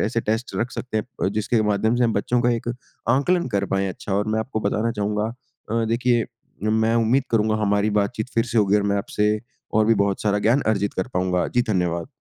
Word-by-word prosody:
ऐसे 115 Hz, +2 st, 0 dB
टेस्ट 110 Hz, +3 st, -2 dB
रख 120 Hz, +2 st, -1 dB
सकते 125 Hz, -3 st, -5 dB
हैं 110 Hz, -, -1 dB, 0.2 s
प -, -, +3 dB
जिसके 110 Hz, +1 st, +1 dB
माध्यम 105 Hz, +2 st, +1 dB
से 125 Hz, -, +3 dB
हम 115 Hz, -, +2 dB
बच्चों 120 Hz, +4 st, +1 dB
का 120 Hz, -, +3 dB
एक 120 Hz, 0 st, -2 dB, 0.4 s
आंकलन 155 Hz, +7 st, +2 dB
कर 100 Hz, -, +1 dB
पाएँ 95 Hz, 0 st, +1 dB
अच्छा 95 Hz, +2 st, -6 dB
और 105 Hz, +2 st, 0 dB
मैं 110 Hz, -, +1 dB
आपको 110 Hz, -1 st, -3 dB
बताना 115 Hz, +3 st, 0 dB
चाहूँगा 105 Hz, +1 st, -1 dB, 0.4 s
अ, 115 Hz, 0 st, +1 dB
देखिए, 120 Hz, +1 st, +1 dB, 0.5 s
मैं 110 Hz, +1 st, +2 dB
उम्मीद 115 Hz, +4 st, +2 dB
करूँगा, 110 Hz, -1 st, +2 dB
हमारी 105 Hz, +1 st, +2 dB
बातचीत 110 Hz, +3 st, -2 dB
फिर 115 Hz, -, +3 dB
से 120 Hz, -1 st, -1 dB
होगी 105 Hz, -1 st, +4 dB
और 105 Hz, -, +1 dB
मैं -, -, +1 dB
आपसे 105 Hz, 0 st, 0 dB, 0.4 s
और 110 Hz, 0 st, +4 dB
भी 115 Hz, -, +5 dB
बहुत 100 Hz, -1 st, -2 dB
सारा 105 Hz, -1 st, +2 dB
ज्ञान 120 Hz, +6 st, +4 dB
अर्जित 100 Hz, -2 st, 0 dB
कर 95 Hz, -, -2 dB
पाऊँगा। 90 Hz, 0 st, +1 dB
जी, 120 Hz, -, +2 dB
धन्यवाद। 90 Hz, -6 st, -1 dB
110 Hz, 220 wpm, -23 LUFS, 100-115 Hz, 0.5 s, भी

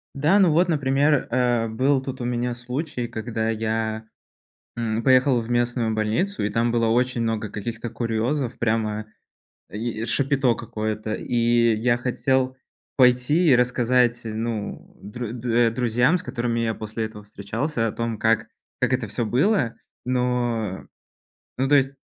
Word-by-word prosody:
Да, 150 Hz, +8 st, +3 dB
ну 190 Hz, -5 st, +5 dB
вот, 170 Hz, +3 st, +3 dB
например, 145 Hz, -1 st, +2 dB
э, 120 Hz, -2 st, +2 dB
был 130 Hz, +5 st, +2 dB
тут 130 Hz, -1 st, -6 dB
у -, -, -3 dB
меня 120 Hz, 0 st, -1 dB
случай, 125 Hz, +1 st, -4 dB
когда 110 Hz, 0 st, -3 dB
я, 110 Hz, 0 st, -2 dB, 0.7 s
м, 115 Hz, -1 st, -1 dB
поехал 130 Hz, -1 st, +4 dB
в 115 Hz, -, -7 dB
местную 120 Hz, -2 st, 0 dB
больницу, 110 Hz, -, -1 dB
и 105 Hz, -, 0 dB
там 115 Hz, +3 st, +1 dB
было 115 Hz, -1 st, +2 dB
очень 125 Hz, +1 st, +1 dB
много 110 Hz, -2 st, -1 dB
каких-то 115 Hz, +3 st, -5 dB
курьёзов, 120 Hz, +3 st, -2 dB
прямо 110 Hz, -1 st, -1 dB, 0.6 s
и 110 Hz, +2 st, -4 dB
шапито 135 Hz, 0 st, +1 dB
какое-то. 110 Hz, -1 st, -3 dB
И 120 Hz, -1 st, +2 dB
я 120 Hz, +2 st, +1 dB
хотел 130 Hz, +1 st, 0 dB, 0.4 s
пойти 130 Hz, +6 st, +4 dB
и -, -, +7 dB
рассказать, 125 Hz, -1 st, +2 dB
ну, 110 Hz, -1 st, -5 dB
дру 115 Hz, +4 st, -6 dB
э, 120 Hz, 0 st, +1 dB
друзьям, 125 Hz, +7 st, +2 dB
с -, -, -9 dB
которыми 120 Hz, -2 st, -2 dB
я 115 Hz, -1 st, 0 dB
после 110 Hz, +1 st, -4 dB
этого 105 Hz, -1 st, -10 dB
встречался, 115 Hz, +5 st, -2 dB
о -, -, -2 dB
том, 115 Hz, 0 st, -3 dB
как 110 Hz, +1 st, +1 dB, 0.3 s
как -, -, +1 dB
это 125 Hz, -3 st, 0 dB
всё 115 Hz, +4 st, -2 dB
было. 125 Hz, -, +1 dB, 0.3 s
Но 120 Hz, -5 st, -1 dB, 0.7 s
но, 135 Hz, +1 st, +1 dB
то 145 Hz, -, +4 dB
есть, 135 Hz, -1 st, +4 dB
120 Hz, 150 wpm, -23 LUFS, 110-130 Hz, 0.7 s, и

